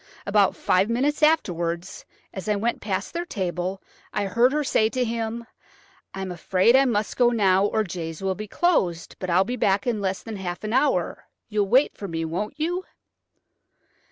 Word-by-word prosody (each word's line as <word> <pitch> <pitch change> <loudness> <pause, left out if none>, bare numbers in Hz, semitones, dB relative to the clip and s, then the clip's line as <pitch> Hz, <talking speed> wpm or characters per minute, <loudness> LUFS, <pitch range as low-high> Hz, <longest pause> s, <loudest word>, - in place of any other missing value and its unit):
About 200 -1 +3
five 190 +4 +2
minutes 275 +7 0
afterwards, 175 - 0 0.3
as 190 +1 -5
I 210 - +3
went 230 +4 -1
past 195 -3 -3
their 345 0 -2
table, 185 - -3 0.3
I 205 - -1
heard 235 +6 +3
her 300 +1 0
say 220 -5 +2
to 255 +1 -1
him. 230 0 -3 0.7
'I 195 - -4
am 190 - -5
afraid 185 +6 +3
I 270 +1 +6
must 215 -4 0
go 245 -1 +4
now, 200 -4 +3
or 220 +1 0
Jay's 165 -4 -6
will 190 0 +1
be 215 +3 -7
closed, 190 - 0
but 185 - -4
I'll 180 +2 +4
be 245 +5 -4
back 200 -2 +1
in 230 -4 -1
less 190 -1 -2
than 220 -2 -6
half 180 -1 -5
an 215 +1 -3
hour. 265 +4 +1 0.2
You'll 210 -2 +1
wait 260 +6 +4
for 200 - -6
me, 165 -2 -3
won't 205 - -4
you?'" 350 +4 -1
205 Hz, 185 wpm, -24 LUFS, 185-240 Hz, 0.7 s, I